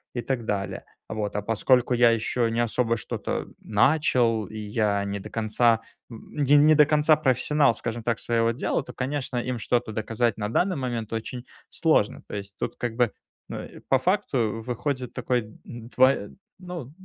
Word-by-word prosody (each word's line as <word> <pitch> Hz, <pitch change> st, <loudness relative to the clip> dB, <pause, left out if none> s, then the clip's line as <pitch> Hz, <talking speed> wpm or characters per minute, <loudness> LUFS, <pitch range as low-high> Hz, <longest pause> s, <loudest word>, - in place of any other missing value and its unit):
и 120 Hz, -, -1 dB
так 120 Hz, -1 st, -3 dB
далее. 100 Hz, -2 st, -3 dB, 0.3 s
Вот, 105 Hz, -2 st, -3 dB
а 105 Hz, -, 0 dB
поскольку 120 Hz, +4 st, +2 dB
я 120 Hz, -1 st, +5 dB
ещё 115 Hz, +1 st, 0 dB
не 115 Hz, -, -1 dB
особо 115 Hz, 0 st, 0 dB
что-то -, -, -4 dB
начал 115 Hz, -1 st, +2 dB
и 110 Hz, -, -9 dB
я 105 Hz, -1 st, 0 dB
не 100 Hz, 0 st, -3 dB
до -, -, -9 dB
конца, 115 Hz, +1 st, +2 dB, 0.3 s
н 140 Hz, +5 st, -5 dB, 0.2 s
не 155 Hz, 0 st, +6 dB
до 150 Hz, -1 st, +7 dB
конца 150 Hz, +1 st, +4 dB
профессионал, 140 Hz, -1 st, +2 dB
скажем 115 Hz, +1 st, -4 dB
так, 115 Hz, -2 st, 0 dB
своего 115 Hz, -1 st, +1 dB
дела, 115 Hz, -, -1 dB
то, -, -, -10 dB
конечно, 130 Hz, -1 st, -3 dB
им 125 Hz, 0 st, -2 dB
что-то 120 Hz, +1 st, 0 dB
доказать 115 Hz, +1 st, -1 dB
на 105 Hz, -1 st, -3 dB
данный 180 Hz, +10 st, +1 dB
момент 120 Hz, -5 st, -3 dB
очень 120 Hz, +2 st, -5 dB, 0.2 s
сложно. -, -, +1 dB
То -, -, -7 dB
есть 100 Hz, 0 st, -7 dB
тут -, -, -3 dB
как 120 Hz, -2 st, -4 dB
бы, 120 Hz, -3 st, +3 dB, 0.4 s
ну, -, -, -5 dB
и -, -, -12 dB
по 135 Hz, -, +4 dB
факту 125 Hz, -, 0 dB
выходит 125 Hz, +2 st, -3 dB
такой 125 Hz, -2 st, 0 dB
д 110 Hz, -, -15 dB
двой 120 Hz, -1 st, +1 dB, 0.2 s
ну, 175 Hz, -8 st, -7 dB
120 Hz, 175 wpm, -25 LUFS, 110-130 Hz, 0.4 s, до